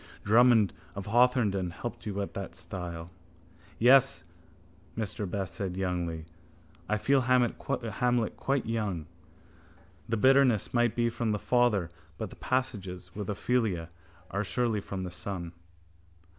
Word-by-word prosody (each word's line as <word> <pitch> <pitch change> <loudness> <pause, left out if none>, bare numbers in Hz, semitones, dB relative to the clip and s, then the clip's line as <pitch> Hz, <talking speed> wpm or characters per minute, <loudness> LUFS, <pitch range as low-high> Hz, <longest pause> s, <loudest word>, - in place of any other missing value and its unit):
Drummond 115 -2 +5 0.2
of 100 -1 -5
Hawthornden 110 -5 +3
helped 115 +3 -6
you 100 -1 -2
at - - -7
that 95 -3 -6
stile. 90 -3 -6 0.7
—Yes, 130 +3 +5 0.7
Mr 105 -3 -3
Best 95 -3 -3
said 95 -1 -3
youngly. 90 -4 -2 0.6
I 105 - +2
feel 135 +5 +3
Hamlet 125 -2 +1
quite 135 -1 0
young. 105 -8 -2 1.0
The 115 - +1
bitterness 130 -2 +4
might 120 -2 +2
be 120 -1 +1
from 115 -2 -1
the - - 0
father 105 -7 +2 0.3
but - - -5
the - - -10
passages 95 -9 -3
with 105 -1 -5
Ophelia 105 -6 0 0.4
are 100 +1 0
surely 115 -3 0
from 95 -1 -5
the 90 - -5
son. 90 -2 -5
105 Hz, 130 wpm, -29 LUFS, 95-120 Hz, 1.0 s, Drummond